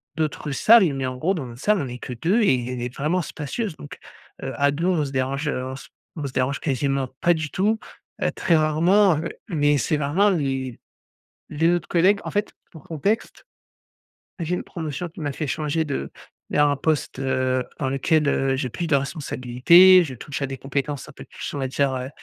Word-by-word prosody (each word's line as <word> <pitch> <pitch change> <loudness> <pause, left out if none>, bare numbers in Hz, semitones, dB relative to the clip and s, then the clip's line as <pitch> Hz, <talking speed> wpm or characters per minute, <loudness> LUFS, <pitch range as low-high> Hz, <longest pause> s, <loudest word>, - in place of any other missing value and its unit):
d'autres 155 -2 -2
salles. 195 +2 +5
Mais, 135 -1 -2
en 130 0 -3
gros, 165 +9 +1
dans 160 -8 -4
notre 120 +1 -10
salle 210 -1 +2
on 140 - -3
est 125 0 -6
que 125 - -6
2 175 - +1
et 125 - +2
elle 125 - -5
est 125 0 -4
vraiment 155 +6 0
spacieuse 165 +5 -4
donc, 145 - -10 0.5
heu, - - -3
à 145 0 +3
2, 155 +4 -2
on 170 -5 +2
se 135 - -6
dérange, 135 +2 -1
heu, 130 -3 -1
on 130 - -5
s 135 - -10 0.3
on 150 - -4
se - - -8
dérange 130 +2 0
quasiment 135 -1 0
pas 175 - +4
du 160 -2 -3
tout, 210 +7 +1 0.4
heu, - - +1
très 170 - +1
rarement, 170 +4 +4
heu. 155 - -3 0.2
Mais 145 -3 +2
c'est 150 +2 0
vraiment 150 +8 +2
les 135 - -2 0.7
les 160 +2 +2
autres 175 -1 -2
collègues, 185 +4 +3
en - - -4
fait, 205 +1 -1 0.2
pour 160 -4 -13
contexte, 200 - -2 0.9
j'ai 170 +1 -1
une - - -4
promotion 165 +1 -5
qui 165 0 -11
m'a 145 -2 -2
fait 150 +2 -4
changer 155 +2 -1
de 135 - -3 0.4
vers 145 0 +3
un 145 - +1
poste, 150 -2 -1
heu, 130 -1 0
dans 135 - -1
lequel, 150 +3 +1
heu, 135 -1 +1
j'ai 130 -2 -2
plus 170 +8 -4
de 155 - +3
responsabilités, 140 +6 +5
je 135 -6 -6
touche 140 +4 -6
à - - +1
des 135 0 -6
compétences 140 +1 -3
un - - -12
peu - - -11
plus - - -7
on - - -4
va 135 - -1
dire, 135 +1 0
heu 130 0 -4
145 Hz, 215 wpm, -23 LUFS, 135-170 Hz, 0.9 s, salles